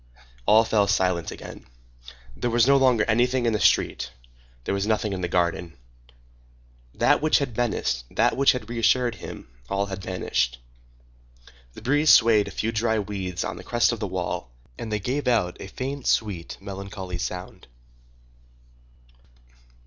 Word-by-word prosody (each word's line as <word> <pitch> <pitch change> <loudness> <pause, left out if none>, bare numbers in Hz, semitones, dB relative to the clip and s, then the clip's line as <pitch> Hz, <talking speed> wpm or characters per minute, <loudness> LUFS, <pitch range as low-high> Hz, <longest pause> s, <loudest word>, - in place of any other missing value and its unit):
All 110 +1 +6
fell 105 -2 +2
silent 90 -4 +1
again. - - -10 0.7
There 120 - -2
was 120 0 +4
no 140 +1 +5
longer 130 -5 +4
anything 120 +2 +2
in 115 - +2
the 105 - 0
street; - - +2 0.5
there - - -2
was 100 +1 -1
nothing 110 -2 0
in 95 - -4
the 90 - -1
garden. 85 -1 -1 1.2
That - - +3
which 155 0 +4
had 135 -5 -3
menaced, 105 - -1
that - - +2
which 135 +1 +4
had 125 -4 -5
reassured 120 +1 +2
him,—all - - -6
had 95 -1 -6
vanished. 60 -10 -1 1.2
The - - -12
breeze 145 +4 +2
swayed 110 -3 +6
a - - -10
few 110 - 0
dry 110 0 0
weeds 95 -3 -3
on - - -4
the - - -9
crest 120 0 +2
of 120 - -4
the 105 - -2
wall, 90 -8 -4 0.3
and 110 - -7
they 105 - 0
gave 130 +8 -2
out 110 -8 +1
a - - -7
faint, 135 +5 -5
sweet, 95 -6 -1
melancholy 95 -2 -7
sound. 90 +1 -6
105 Hz, 155 wpm, -25 LUFS, 95-120 Hz, 1.2 s, All